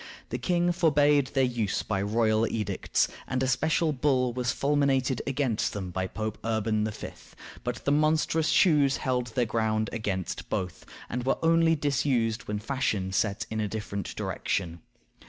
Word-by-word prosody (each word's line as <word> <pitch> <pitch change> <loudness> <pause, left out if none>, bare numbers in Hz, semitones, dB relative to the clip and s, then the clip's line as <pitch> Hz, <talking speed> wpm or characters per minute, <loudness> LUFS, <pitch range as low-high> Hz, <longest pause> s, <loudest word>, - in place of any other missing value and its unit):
The 125 - -3
king 175 +6 +1
forbade 145 -5 +3
their 135 0 +1
use 120 -6 0
by 100 -2 -1
royal 110 +2 +2
edicts, 105 -4 0 0.2
and 130 0 -1
a - - +1
special 155 +4 +1
bull 130 -3 +1
was 125 0 0
fulminated 140 -3 +1
against 135 -5 0
them 95 -3 -5
by 95 +1 -2
Pope 110 +2 -4
Urban 110 -1 0
V., 110 - -5 0.5
but - - -4
the 140 - +2
monstrous 155 +1 +2
shoes 145 -6 +4
held 125 -2 -1
their 120 +1 0
ground 110 -1 0
against 100 -5 -3
both, 90 -2 -4 0.2
and 125 0 -3
were 135 - +1
only 165 0 +4
disused 135 -5 0
when 105 - -2
fashion 105 -5 -1
set 100 +2 0
in 110 - -2
a 105 - 0
different 100 -3 -5
direction. 85 -3 -2
125 Hz, 155 wpm, -28 LUFS, 110-140 Hz, 0.5 s, shoes